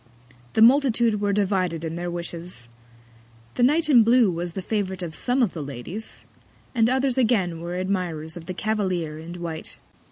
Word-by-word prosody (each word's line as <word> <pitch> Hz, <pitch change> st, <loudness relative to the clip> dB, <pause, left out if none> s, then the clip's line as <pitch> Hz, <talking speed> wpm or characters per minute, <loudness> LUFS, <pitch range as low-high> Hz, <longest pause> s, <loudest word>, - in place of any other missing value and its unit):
The 220 Hz, -, +5 dB
Multitude 235 Hz, -4 st, +4 dB
were 205 Hz, -1 st, +1 dB
divided 185 Hz, -5 st, 0 dB
in 160 Hz, 0 st, -4 dB
their 175 Hz, +1 st, -3 dB
Wishes. 170 Hz, -6 st, -6 dB, 0.9 s
The -, -, -2 dB
Knight 300 Hz, +6 st, +4 dB
in 250 Hz, -6 st, +7 dB
blue 230 Hz, -2 st, +5 dB
was 170 Hz, 0 st, -4 dB
the 190 Hz, -, -4 dB
Favourite 190 Hz, -3 st, -2 dB
of 165 Hz, -2 st, -5 dB
some 250 Hz, +8 st, +1 dB
of 210 Hz, -, 0 dB
the 160 Hz, -, -5 dB
Ladies; 145 Hz, -, -6 dB, 0.5 s
and 230 Hz, -2 st, +3 dB
others 260 Hz, 0 st, +1 dB
again 195 Hz, -9 st, +1 dB
were 175 Hz, +1 st, -4 dB
Admirers 180 Hz, -4 st, -2 dB
of 170 Hz, -2 st, -9 dB
the 185 Hz, -, -4 dB
Cavalier 185 Hz, -8 st, -1 dB
in 170 Hz, +2 st, -8 dB
white. 170 Hz, -2 st, -6 dB
185 Hz, 170 wpm, -24 LUFS, 170-225 Hz, 0.9 s, in